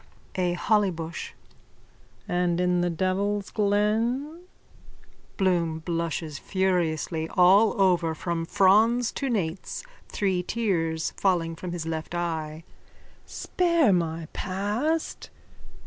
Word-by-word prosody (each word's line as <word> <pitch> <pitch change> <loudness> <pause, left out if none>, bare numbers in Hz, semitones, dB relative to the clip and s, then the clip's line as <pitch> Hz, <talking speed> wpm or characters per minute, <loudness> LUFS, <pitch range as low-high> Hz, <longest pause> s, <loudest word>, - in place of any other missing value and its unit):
A 180 -2 0
HOLLYBUSH: 175 -4 -1 0.9
And 175 -1 +1
in 180 0 +2
the 175 - +1
devil's 190 +4 -1
glen? 230 - 0 0.9
BLOOM: 170 -5 +1
(Blushes 165 -3 -2
furiously 170 -4 -1
all 195 +3 +5
over 175 -4 +3
from 165 0 -3
frons 220 +6 +4
to 275 - -2
nates, 190 - -2 0.2
three 190 -3 0
tears 175 -6 -1
falling 170 -4 +1
from 175 +2 -6
his 170 -2 -4
left 160 +1 -4
eye.) 160 -2 -3 0.6
Spare 335 - +2
my 165 -2 -1
past. 210 - -2
180 Hz, 100 wpm, -26 LUFS, 165-205 Hz, 0.9 s, all